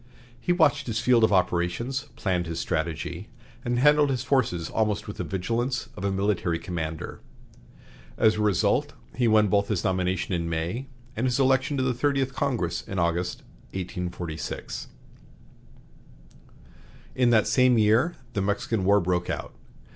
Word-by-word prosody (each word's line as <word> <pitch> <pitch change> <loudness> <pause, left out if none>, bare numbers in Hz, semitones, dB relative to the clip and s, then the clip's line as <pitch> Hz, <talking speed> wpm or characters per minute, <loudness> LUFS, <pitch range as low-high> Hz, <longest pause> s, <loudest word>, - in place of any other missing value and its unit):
He 175 - -1
watched 145 -5 +3
his 115 -1 -1
field 120 -1 +4
of 110 - +4
operations, 95 +9 0
planned 90 -3 -1
his 85 0 -4
strategy, 85 +4 -3 0.3
and 120 0 -1
handled 150 +2 +5
his 125 -3 -1
forces 115 -12 +1
almost 110 -2 -1
with 105 - -7
the - - -2
vigilance 115 +7 -2
of - - -7
a 100 - +1
military 95 -3 0
commander. 80 -2 -5 1.0
As 110 - +4
a 105 - -2
result, 105 -4 +2 0.2
he 120 -1 +1
won 110 -1 +5
both 100 0 +2
his 105 -5 -1
nomination 95 0 0
in 85 -1 -1
May 85 +11 -3 0.3
and 120 +4 0
his 125 +1 0
election 135 +2 +2
to 130 - +1
the 130 -1 +1
Thirtieth 135 +1 0
Congress 115 -12 -1
in 100 - -7
August, 85 +1 -1 0.3
1846. 90 -3 -5 2.3
In 125 -1 +3
that 110 -3 +4
same 125 -2 +4
year 110 +10 +3 0.2
the 100 - 0
Mexican 100 +1 -1
War 100 +2 +5
broke 90 -1 -1
out. - - -4
105 Hz, 150 wpm, -26 LUFS, 90-125 Hz, 2.3 s, handled